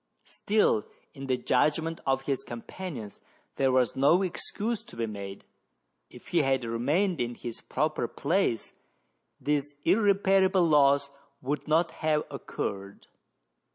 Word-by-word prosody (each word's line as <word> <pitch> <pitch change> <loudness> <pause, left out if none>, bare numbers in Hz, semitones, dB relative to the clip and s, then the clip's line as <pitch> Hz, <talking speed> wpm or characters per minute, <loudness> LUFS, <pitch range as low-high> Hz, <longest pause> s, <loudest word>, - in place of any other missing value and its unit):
Still, 205 - +1 0.3
in 135 -2 -8
the 130 -1 +1
judgment 160 +6 +1
of 135 0 +1
his 135 -1 -2
companions, 120 - -7 0.4
there 135 -1 +3
was 130 -2 +2
no 155 +8 +4
excuse 210 +4 -2
to 225 - -13
be 115 0 -1
made: 100 -2 -7 0.6
if - - -14
he 170 - +3
had 135 -2 +1
remained 145 - 0
in 120 0 -2
his 115 -1 -7
proper 150 -3 -1
place 155 - -1 0.7
this 145 0 -1
irreparable 195 -2 +4
loss 140 -2 +4 0.3
would 140 +3 -3
not 165 +2 +2
have 155 -1 0
occurred. 100 0 -5
145 Hz, 125 wpm, -28 LUFS, 125-175 Hz, 0.7 s, no